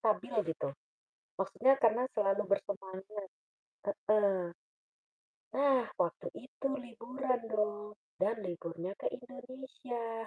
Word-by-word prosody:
stabil 215 -2 +2 0.2
gitu, 160 - -1 0.7
maksudnya 225 +7 +5
karena 230 +2 +6
selalu 200 -1 +4
bersemangat, 195 0 -2 0.6
heeh, 200 -3 +3 1.1
nah 270 -3 +5
waktu 170 - +1 0.2
itu 270 - -4
liburan 250 +2 -1
dong, 210 -1 0 0.3
dan 210 +4 +4
liburnya 170 +1 -3
ke - - -3
Indonesia. 250 -3 -5
215 Hz, 95 wpm, -35 LUFS, 195-250 Hz, 1.1 s, karena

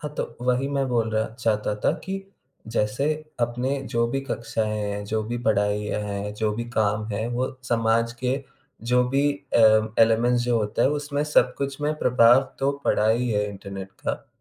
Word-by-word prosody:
हाँ, 150 -1 -5
तो - - -4
वही 125 +2 +1
मैं 140 -1 0
बोल 115 -3 +1
रहा 110 0 0
चाहता 105 -2 0
था - - +5
कि 190 - -4 0.6
जैसे 115 +4 0 0.3
अपने 125 +4 0
जो 115 0 +2
भी 135 - -1
कक्षाएँ 110 -5 -2
हैं, 105 0 -3
जो 110 +1 -1
भी 120 +2 -3
पढ़ाइयाँ 105 -1 +1
हैं, 100 0 -4
जो 105 0 0
भी 120 +2 -3
काम 105 -2 +1
हैं, 110 +2 -2
वो 125 +2 -1 0.2
समाज 115 0 +2
के 130 +2 0 0.5
जो 125 0 +5
भी 135 +2 +1 0.3
अ, - - +5 0.4
एलीमेंट्स 120 +2 +3
जो 120 -1 +1
होते 105 0 0
है, - - +4
उसमें 145 0 -1
सब 150 -4 +3
कुछ 140 0 -3
में 150 +1 0
प्रभाव 120 -1 +6 0.2
तो 135 +1 +2
पड़ा 105 - +2
ही 120 +3 +2
है 105 -1 0
इंटरनेट 100 -1 -8
का। - - -3
115 Hz, 185 wpm, -24 LUFS, 105-130 Hz, 0.6 s, प्रभाव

